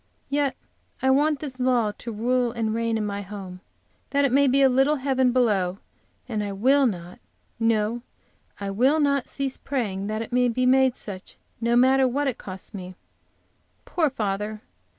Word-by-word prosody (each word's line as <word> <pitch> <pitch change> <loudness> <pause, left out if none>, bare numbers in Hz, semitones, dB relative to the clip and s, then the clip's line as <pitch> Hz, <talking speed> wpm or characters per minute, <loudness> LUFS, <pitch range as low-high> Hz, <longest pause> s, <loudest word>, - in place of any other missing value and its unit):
Yet 285 -2 +1 0.5
I 265 - +4
want 290 +1 +2
this 265 -4 -6
law 245 -4 +2
to 235 - -6
rule 240 +3 0
and 225 -2 -2
reign 230 0 0
in 215 - -2
my 200 0 -3
home, 190 -2 -8 0.5
that 280 0 +2
it 275 - +1
may 280 +2 +4
be 275 +1 +4
a - - +7
little 270 +4 +3
heaven 260 -2 +1
below, 200 -7 +1 0.5
and 215 -4 -2
I 200 -1 -4
will 265 +7 +4
not, 175 -4 -6 0.4
no, 225 0 +1 0.6
I 200 -1 -3
will 260 +10 +3
not, 280 -3 +1
cease 275 -2 -3
praying 205 -8 -3
that 215 +1 -2
it 230 - -10
may 250 0 +3
be 255 +2 +3
such, 190 -2 -9 0.2
no 235 +1 +2
matter 260 +2 +5
what 280 +4 -1
it 260 - -2
costs 185 -1 -9
me. 185 -2 -8 0.9
Poor 320 -4 +1
father! 210 -2 -3
240 Hz, 170 wpm, -25 LUFS, 210-265 Hz, 0.9 s, a